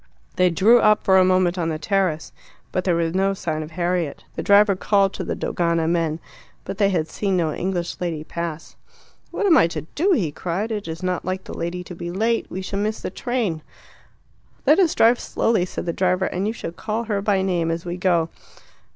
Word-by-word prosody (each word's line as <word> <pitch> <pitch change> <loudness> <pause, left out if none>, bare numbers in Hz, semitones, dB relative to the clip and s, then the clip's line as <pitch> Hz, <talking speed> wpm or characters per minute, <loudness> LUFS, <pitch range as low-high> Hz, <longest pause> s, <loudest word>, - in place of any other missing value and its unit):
They 180 0 +4
drew 210 +8 +5
up 215 -1 +4
for 190 -1 +5
a - - +6
moment 185 -1 +2
on 165 -1 0
the 155 - -2
terrace. 180 -2 -1 0.4
But 185 - -1
there 180 -3 +2
was 165 -1 0
no 195 +1 +1
sign 155 -4 -3
of 155 - -7
Harriet. 175 -2 -2
The - - -3
driver 200 0 +5
called 195 0 +2
to - - -4
the - - -3
Dogana 170 -2 0
men. 165 -2 0 0.5
But 200 - -6
they 200 -1 +4
had 165 -5 0
seen 195 +2 -1
no 160 -3 0
English 175 -2 -3
lady 165 -4 -3
pass. 165 -1 -6 0.5
"What 420 - -2
am 355 -5 +6
I - - +5
to 160 -2 -5
do?" 375 +6 +2
he 180 - 0
cried; 185 +8 -3
"it 210 -4 -3
is 160 +2 -6
not 185 -1 -1
like 185 +1 -3
the - - -9
lady 175 +2 -4
to 180 - -9
be 170 0 -6
late. 225 +6 0
We 190 - -5
shall 195 +1 -3
miss 215 +1 -1
the - - -5
train." 225 -9 -2 1.0
"Let 300 +6 +5
us 350 -5 +3
drive 235 +2 +5
slowly," 220 -6 0
said - - -5
the 170 - -1
driver, 185 +1 +1
"and 190 +3 -2
you 220 - -1
shall 215 - -6
call 215 +6 -3
her 210 -3 -2
by 200 -2 +1
name 175 -3 0
as 165 +1 -3
we 175 0 -3
go." 175 -3 +1
185 Hz, 220 wpm, -22 LUFS, 170-200 Hz, 1.0 s, a